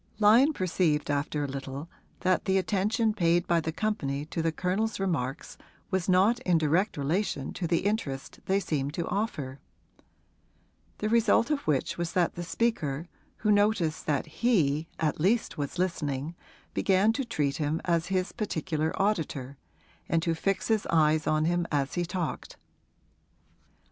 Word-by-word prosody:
Lyon 225 +8 +6
perceived 170 - 0
after 145 +1 -1
a - - -1
little 135 +2 -6 0.3
that 185 0 +2
the 190 0 +2
attention 210 +4 +1
paid 175 -3 +2
by 170 -1 +2
the 160 - -2
company 155 -6 -2
to 165 +1 -3
the 165 0 +1
Colonel's 195 +7 -1
remarks 155 -8 -2 0.3
was 190 -1 0
not 195 +6 +4
in 180 -2 +2
direct 165 +6 +1
relation 145 -1 -1
to 175 - -3
the 170 +3 0
interest 155 -11 -2
they 195 +1 +3
seemed 145 -5 -2
to 170 - -2
offer; 145 - -3 1.4
the 210 - -2
result 230 +4 +3
of 290 -2 -1
which 150 +2 0
was 170 -1 -2
that 175 -2 +2
the 175 - -6
speaker, 170 -5 -1 0.4
who 210 - +5
noticed 205 -6 +2
that 145 -3 +1
he 160 - +1
at 155 -2 0
least 200 +2 +1
was 145 +4 -3
listening, 155 -4 -1 0.4
began 195 +3 +3
to 270 - -1
treat 150 - -1
him 155 0 -1
as 170 -2 +1
his 185 -1 0
particular 160 -7 -2
auditor 155 -10 -1 0.5
and 165 -1 +2
to 165 - +1
fix 195 +4 -1
his 220 -2 +1
eyes 155 -1 +3
on 155 0 +2
him 175 0 +1
as 140 -2 0
he 175 -1 0
talked. 175 -2 -4
170 Hz, 155 wpm, -28 LUFS, 150-200 Hz, 1.4 s, Lyon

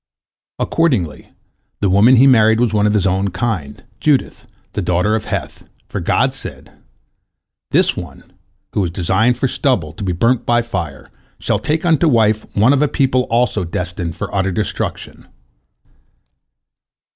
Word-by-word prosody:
Accordingly, 125 - -1 0.5
the 100 - +1
woman 100 +7 +5
he 125 +2 +6
married 110 -4 +5
was 120 -2 +1
of 105 0 +2
his 105 -3 +1
own 95 +1 +1
kind, 90 -7 -4 0.2
Judith, 145 -3 0 0.3
a - - -2
daughter 90 +4 +1
of 110 - -3
Heth, - - -5 0.2
for - - -4
God - - +1
said: - - -9 1.0
"This - - +2
one, - - -8 0.5
who 100 - +1
is 90 - -1
designed 95 +8 +1
for 130 - 0
stubble, 110 - -1
to 100 +5 -8
be 95 - -1
burnt 115 +8 +1
by 120 0 +2
fire, 90 -11 -6 0.3
shall - - -1
take 155 +3 -1
unto 165 -1 +3
wife 110 -5 +2
one 115 +7 +5
of 140 - +1
a 150 - +3
people 130 -3 +1
also 115 -4 +1
destined 85 -1 -4
for - - -6
utter 95 -1 0
destruction." 105 +2 -4
110 Hz, 150 wpm, -17 LUFS, 90-125 Hz, 1.0 s, he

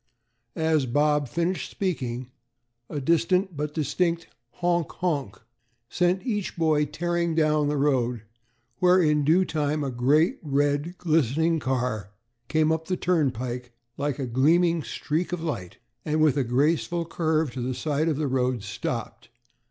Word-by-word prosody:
As 160 -4 +1
Bob 145 +3 +2
finished 170 +8 -2
speaking, 130 -9 -3 0.6
a 145 - -3
distant 170 +5 +1
but 150 +1 -3
distinct 165 +2 0 0.3
"honk 175 -2 0
honk" 145 - -2 0.5
sent 180 +3 +1
each 210 -8 -2
boy 155 -2 +2
tearing 170 +2 -1
down 155 -2 +2
the 145 0 0
road, 125 -5 +1 0.6
where 180 +1 +5
in 150 -3 +3
due 170 +6 +4
time 150 -2 -1
a 135 - -2
great, 150 - +2
red, 145 +3 0
glistening 160 0 +2
car 125 -7 -2 0.4
came 155 0 +2
up 160 0 -1
the 185 - -1
turnpike 125 -8 -1 0.2
like 145 -2 -2
a 135 - -2
gleaming 165 +7 +3
streak 155 +7 -3
of 175 -2 -3
light, 95 - -4 0.3
and, 155 0 0
with 155 -3 +4
a 140 - +1
graceful 155 +7 +1
curve 160 -3 0
to 125 - -5
the 125 +1 -2
side 155 +3 0
of 150 - 0
the 155 - -1
road, 125 -3 0
stopped. 115 +3 -5
150 Hz, 145 wpm, -26 LUFS, 130-170 Hz, 0.6 s, where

